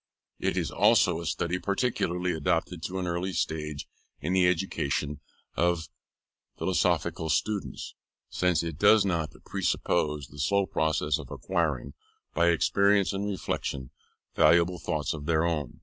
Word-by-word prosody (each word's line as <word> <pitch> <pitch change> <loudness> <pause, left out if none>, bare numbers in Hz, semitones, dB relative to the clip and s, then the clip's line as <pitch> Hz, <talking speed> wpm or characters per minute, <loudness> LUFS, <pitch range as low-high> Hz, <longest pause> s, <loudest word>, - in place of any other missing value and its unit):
It - - -1
is - - -1
also 95 -5 +4
a 85 - -5
study 85 +2 -1
peculiarly 90 -4 -1
adapted 80 +2 -1
to 95 +1 -4
an 95 - -2
early 90 +2 -2
stage 75 -3 -3 0.3
in 80 +6 -2
the 95 -1 +4
education 75 -5 -1 0.4
of 85 -2 +1 0.7
philosophical 80 - 0
students, 85 - -2 0.3
since 90 -3 +1
it 80 -2 -5
does 105 +1 +6
not 85 -6 -1
presuppose 75 -2 0
the 75 - -13
slow 100 +8 +2
process 80 -4 0
of - - -9
acquiring, 75 -8 -2 0.4
by 85 +1 +3
experience 100 +4 +3
and 100 +1 -2
reflection, 70 -9 -3 0.4
valuable 85 +1 +4
thoughts 75 0 -2
of 75 -2 -7
their 80 0 +2
own. 75 -2 -2
85 Hz, 135 wpm, -28 LUFS, 75-95 Hz, 0.7 s, does